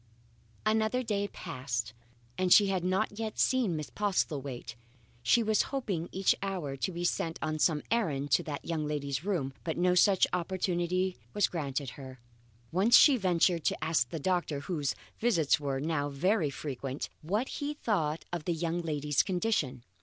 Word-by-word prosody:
Another 220 +3 +2
day 205 -3 -1
passed, 125 - -4 0.4
and 185 +3 0
she 200 0 +7
had 190 -2 0
not 200 +3 0
yet 220 -1 -4
seen 245 -10 +2
Miss 150 -2 -5
Postlethwaite. 140 - -2 0.5
She 230 - +4
was 215 -1 +3
hoping 200 - -2
each 190 0 +3
hour 180 -8 -3
to 160 +7 -2
be 175 0 -4
sent 165 -1 -1
on 155 0 -2
some 150 -2 +2
errand 145 -12 0
to 120 - +5
that 145 -2 -6
young 160 -3 -2
lady's 140 -1 -2
room, 170 -10 -1
but 160 - -3
no 180 +1 +3
such 190 +1 +5
opportunity 180 0 -1 0.2
was 205 - +4
granted 140 -5 -3
her. 130 -1 -10 0.5
Once 195 +7 +6
she 285 - +7
ventured 180 -5 +2
to - - 0
ask 155 -7 +1
the 165 - -4
doctor, 170 -3 -1
whose 150 -3 -2 0.2
visits 170 - +3
were 140 -2 -2
now 145 -1 -1
very 170 +4 +1
frequent, 135 -1 -5
what 205 +11 -1
he 295 +1 -3
thought 165 - -1
of 170 -3 -3
the 175 - +1
young 170 +1 -1
lady's 150 -3 +1
condition. 175 - -1
170 Hz, 165 wpm, -30 LUFS, 145-195 Hz, 0.5 s, she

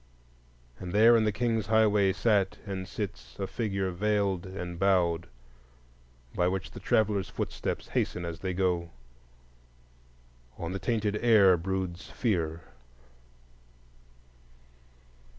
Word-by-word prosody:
And 90 -1 -6
there 115 +3 +7
in 110 -1 +3
the 105 - +2
King's 115 -2 -1
Highways 105 -3 +3
sat 100 0 +2
and 95 -2 -5
sits 65 - -6
a 100 - -2
figure 95 -3 -2
veiled 100 -1 0
and 90 -2 -6
bowed, 90 -3 +2 1.1
by 90 - +1
which 95 0 -3
the - - -9
traveller's 105 -3 +1
footsteps - - -4
hasten 90 - -1
as 85 -1 -5
they 95 -1 -3
go. 90 -2 0 1.7
On 85 +1 -4
the 95 - -3
tainted 105 -2 0
air 105 -5 +6
broods 95 +1 -4
fear. 85 -8 -1
95 Hz, 115 wpm, -29 LUFS, 90-105 Hz, 1.7 s, there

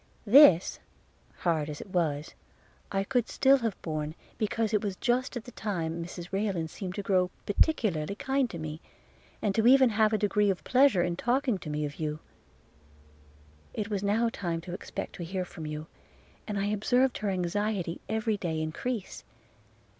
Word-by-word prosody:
This, 210 - +7 0.6
hard 160 -4 +1
as 150 - -6
it 195 - -10
was, 155 -5 -1 0.6
I 195 0 +1
could 245 +2 0
still 270 +1 +5
have 225 -5 -2
borne, 155 -1 -3 0.2
because 220 0 0
it 210 - +2
was 200 -2 -2
just 250 +4 0
at 235 - -6
that 245 - -13
time 170 -5 -2
Mrs 175 +1 -8
Rayland 195 -5 -1
seemed 185 -2 -6
to 205 - -4
grow 185 -2 +2 0.2
particularly 200 - +1
kind 270 +1 0
to 170 - -6
me; 155 0 -6 0.6
and 205 - +1
to 220 - +2
have 225 - +3
even 260 -1 +7
a 215 0 +3
degree 210 -1 +2
of 190 - -1
pleasure 255 -8 +4
in 175 -1 -2
talking 245 -2 +1
to 160 - -7
me 150 0 -1
of 145 0 -7
you. 150 -1 -2 1.6
It 215 0 -3
was 200 -2 -1
now 215 +4 +2
time 170 -6 -3
to 175 +1 -8
expect 185 - -6
to 175 - -5
hear 185 +2 -3
from 160 -3 -8
you, 150 0 -5 0.6
and 210 -2 -2
I 200 - 0
observed 245 +5 +2
her 210 - -1
anxiety 185 -1 -1
every 220 -1 0
day 165 -5 -2
increase. 190 +8 -4
195 Hz, 175 wpm, -29 LUFS, 170-220 Hz, 1.6 s, This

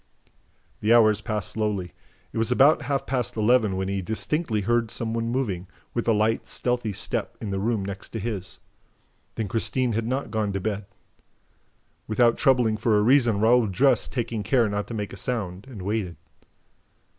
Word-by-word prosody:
The 110 +3 +4
hours 110 -2 +5
passed 105 -4 -2
slowly. 105 -6 -2 0.4
It - - -2
was 115 +2 0
about 140 +5 +5
half 140 -1 -2
past 125 -4 -1
eleven 110 -2 +3
when 95 0 -2
he 100 0 -2
distinctly 110 - -1
heard 115 +2 +1
some 115 0 -3
one 115 0 -1
moving, 105 -8 -2 0.3
with 120 - -2
a - - +5
light, 110 +1 +1
stealthy 125 -3 -1
step, 95 - -2
in 105 - -5
the 95 - -1
room 105 -1 0
next 100 0 -7
to 115 - -3
his. 100 -3 -5 0.8
Then 110 - -2
Christine 120 +4 0
had 115 +1 -1
not 130 +3 -2
gone 105 -3 -1
to 100 - -1
bed! 100 0 -3 1.2
Without 115 +2 +3
troubling 125 -5 +3
for 110 0 +2
a 105 - +3
reason, 120 -3 +4
Raoul 115 +1 +4
dressed, 125 +5 +2
taking 115 -3 -2
care 115 +3 +2
not 105 0 -2
to 115 - -6
make 105 -2 -4
a - - -8
sound, 100 -3 -4
and 105 -8 -8
waited. 100 -3 -2
110 Hz, 180 wpm, -25 LUFS, 100-120 Hz, 1.2 s, hours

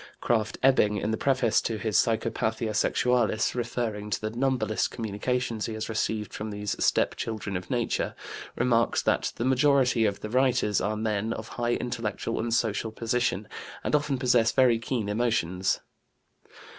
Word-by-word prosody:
Krafft 115 -2 0
Ebing, 105 -6 +4
in 105 +2 -1
the - - +1
preface 130 -3 +2
to 115 - -2
his 110 -1 -2
Psychopathia 110 0 +1
Sexualis, 115 0 +1
referring 115 -3 -3
to - - -1
the 110 0 -3
"numberless" 120 -4 0
communications 115 +1 -2
he 110 - -4
has 110 +1 -4
received 110 -2 -2
from 110 +1 -5
these 105 -1 -3
"step - - +2
children 110 -3 -4
of 90 0 -5
nature," 120 -2 -1 0.4
remarks 115 -2 +2
that - - +1
"the 120 - -2
majority 130 -3 +3
of 100 -2 -1
the 105 - -5
writers 125 -5 +2
are 105 +1 -1
men 110 0 -1
of 110 0 -7
high 120 0 -1
intellectual 115 -1 -3
and 115 +1 -2
social 110 -1 0
position, 115 -3 -1 0.4
and - - -2
often 145 -2 +1
possess 120 -3 +3
very 125 -3 +4
keen 115 -2 -2
emotions." 105 -5 0
115 Hz, 155 wpm, -27 LUFS, 105-120 Hz, 0.4 s, Ebing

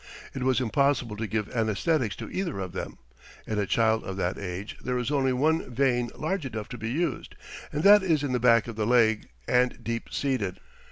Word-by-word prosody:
It 135 - -5
was 130 0 +2
impossible 130 -2 +1
to 110 +1 -3
give 105 -1 -2
anæsthetics 115 - 0
to - - -7
either 185 - -2
of 95 -2 -4
them. - - -6 0.5
In 105 -1 -2
a 100 - 0
child 110 +1 +2
of 95 0 -5
that 95 -1 -1
age 95 +2 -5
there 125 0 -1
is 125 +3 -2
only 135 -2 +2
one 150 +4 +1
vein 125 -1 +1
large 185 +3 -2
enough 110 -5 -5
to 125 - -6
be 110 +1 -3
used, 150 +2 -2 0.4
and 150 +2 -2
that 205 +1 +8
is 160 -6 +1
in 140 - -1
the 125 - +1
back 115 -2 +4
of 115 - -6
the 105 -1 -1
leg, 115 -3 +3 0.2
and 125 0 +1
deep 115 0 -3
seated. 125 -10 -2
125 Hz, 210 wpm, -27 LUFS, 110-140 Hz, 0.5 s, that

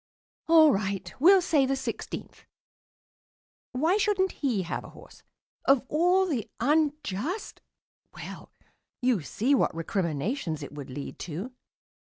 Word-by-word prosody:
"All 320 -2 +7
right, 195 -2 -2
we'll 370 +5 +6
say 310 -5 +3
the 270 - +1
sixteenth. 265 - -6 1.2
Why 315 +10 +2
shouldn't 395 -3 +1
he 240 -10 -1
have 170 - -4
a - - -11
horse? - - -15 0.4
Of 275 -2 +4
all 360 +5 +3
the 270 - -2
unjust 300 - -1 0.5
Well, - - -9 0.5
you 245 -7 +2
see 235 - 0
what 265 - +2
recriminations 165 - -2
it - - -8
would 145 -2 -8
lead 140 +2 -7
to. 180 +9 -5
260 Hz, 125 wpm, -27 LUFS, -, 1.2 s, All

